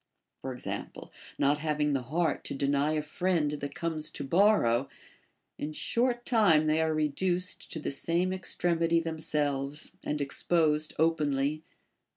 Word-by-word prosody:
For 130 - -4
example, 125 - -6 0.3
not 145 +1 +2
having 150 -1 0
the 135 - 0
heart 155 +5 -1
to - - -4
deny 140 +2 +1
a 155 -1 -1
friend 160 -1 0
that 145 -1 -5
comes 160 -2 -2
to 145 - -6
borrow, 135 - +3 0.7
in 150 +1 -4
short 240 +7 0
time 200 - +4
they 155 +1 +2
are 160 0 +1
reduced 175 +4 -1
to - - -4
the 150 - -3
same 170 +6 +1
extremity 170 -2 +1
themselves, 150 -3 -2
and 150 - -2
exposed 150 +1 +1
openly. 150 -2 +1
155 Hz, 140 wpm, -29 LUFS, 145-170 Hz, 0.7 s, time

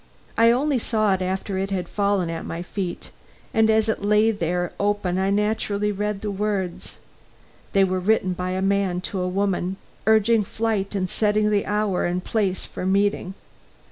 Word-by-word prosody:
I 230 0 +5
only 265 +3 +2
saw 215 -3 +1
it 190 - -1
after 190 +1 -2
it 195 +1 -2
had 185 -3 -2
fallen 200 -4 0
at 165 0 -4
my 170 +1 -5
feet, 180 -1 -5 0.4
and 220 0 +4
as 220 0 +3
it 220 - -1
lay 210 +2 +4
there 175 -3 -2
open 200 -3 0
I 190 +1 +1
naturally 210 0 0
read 210 0 -2
the 210 - -3
words. 195 -3 -3 0.8
They 195 - +5
were 185 -1 +1
written 185 -1 +2
by 180 +1 -3
a 190 +1 -1
man 195 -2 +1
to 190 +1 -4
a 180 - -1
woman, 190 0 -1 0.3
urging 220 0 +4
flight 210 -1 -2
and 185 -2 0
setting 210 +1 +1
the 205 -1 +1
hour 205 -4 0
and 180 +1 -2
place 195 -5 -1
for - - -7
meeting. 195 0 +1
200 Hz, 175 wpm, -23 LUFS, 185-210 Hz, 0.8 s, I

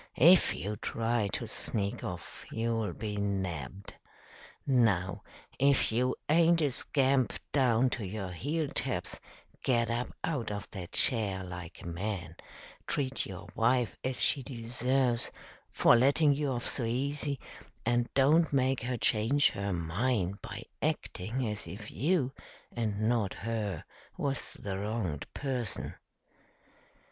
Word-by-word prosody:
If 175 +7 +7
you 105 +3 -4
try 115 0 0
to - - -2
sneak 100 -2 -2
off, 90 -1 -6
you'll 115 -3 -1
be 105 +1 -4
nabbed. 95 -4 -3 0.7
Now, 105 -9 +2 0.4
if 140 -3 +4
you 125 +3 +1
aint 165 +2 +5
a 145 - +2
scamp 135 0 +3 0.2
down 130 -2 +3
to 115 - -2
your 95 -1 -4
heel 145 - -1
taps, - - -1 0.4
get 120 -2 +2
up 120 +1 -2
out 135 -9 -1
of 100 -1 -4
that 95 -3 -7
chair 100 -6 +3
like 90 -1 -8
a - - -7
man, 90 +2 -4 0.5
treat 135 -3 0
your 95 -2 -8
wife 120 -1 +2
as 130 0 -2
she 140 - +4
deserves 125 0 0 0.4
for - - +6
letting 140 +4 +5
you 145 0 -1
off 120 -2 -2
so 130 - 0
easy, 140 +4 -1 0.5
and 120 0 +1
don't 150 +5 +5
make 135 -1 +2
her 120 +1 -2
change 115 +7 +3
her 100 0 -3
mind 95 +3 0
by - - -7 0.2
acting 115 +7 -1
as 105 -4 -4
if 105 +5 -8
you, 140 - +1 0.4
and 110 -3 -1
not 110 -3 +1
her, 105 -7 -3 0.3
was 135 -1 -2
the 95 -1 -5
wronged 100 -8 -3
person." 125 -7 -2
115 Hz, 135 wpm, -31 LUFS, 100-130 Hz, 0.7 s, If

